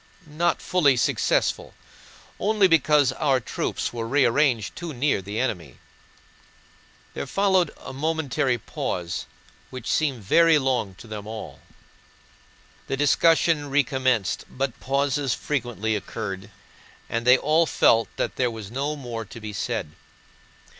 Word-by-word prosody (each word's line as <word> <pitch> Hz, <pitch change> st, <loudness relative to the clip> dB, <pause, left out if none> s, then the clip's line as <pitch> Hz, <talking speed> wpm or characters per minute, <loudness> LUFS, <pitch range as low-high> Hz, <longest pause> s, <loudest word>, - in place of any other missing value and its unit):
not 160 Hz, +3 st, -1 dB
fully 145 Hz, -8 st, +3 dB
successful, -, -, 0 dB, 0.6 s
only 210 Hz, -2 st, +3 dB
because 150 Hz, -4 st, +4 dB
our 135 Hz, -1 st, +1 dB
troops 115 Hz, -, -3 dB
were 115 Hz, -1 st, -4 dB
rearranged 125 Hz, -3 st, +2 dB
too 170 Hz, -3 st, -6 dB
near 130 Hz, -4 st, +1 dB
the 100 Hz, +3 st, -5 dB
enemy...." 90 Hz, -, -3 dB, 1.4 s
There -, -, -5 dB
followed 190 Hz, -3 st, +2 dB
a -, -, -9 dB
momentary 140 Hz, -3 st, 0 dB
pause, 90 Hz, -5 st, -4 dB, 0.4 s
which 130 Hz, -2 st, -8 dB
seemed 135 Hz, -8 st, 0 dB
very 165 Hz, -, +5 dB
long 130 Hz, -8 st, -1 dB
to 100 Hz, -, -13 dB
them 105 Hz, -2 st, -7 dB
all. 110 Hz, 0 st, -7 dB, 1.3 s
The 135 Hz, -, -2 dB
discussion 150 Hz, +1 st, +3 dB
recommenced, 130 Hz, -6 st, +1 dB
but 130 Hz, -2 st, -3 dB
pauses 140 Hz, -1 st, 0 dB
frequently 120 Hz, -6 st, -2 dB
occurred 100 Hz, -2 st, -5 dB, 0.6 s
and 115 Hz, 0 st, -2 dB
they 125 Hz, +1 st, +8 dB
all 155 Hz, +4 st, +2 dB
felt 115 Hz, -4 st, +3 dB
that -, -, -2 dB
there 125 Hz, -1 st, +2 dB
was 110 Hz, -3 st, -8 dB
no 140 Hz, +4 st, -2 dB
more 120 Hz, -5 st, -6 dB
to 115 Hz, -, -11 dB
be 105 Hz, -1 st, -7 dB
said. 75 Hz, -5 st, -3 dB
130 Hz, 125 wpm, -24 LUFS, 115-150 Hz, 1.4 s, they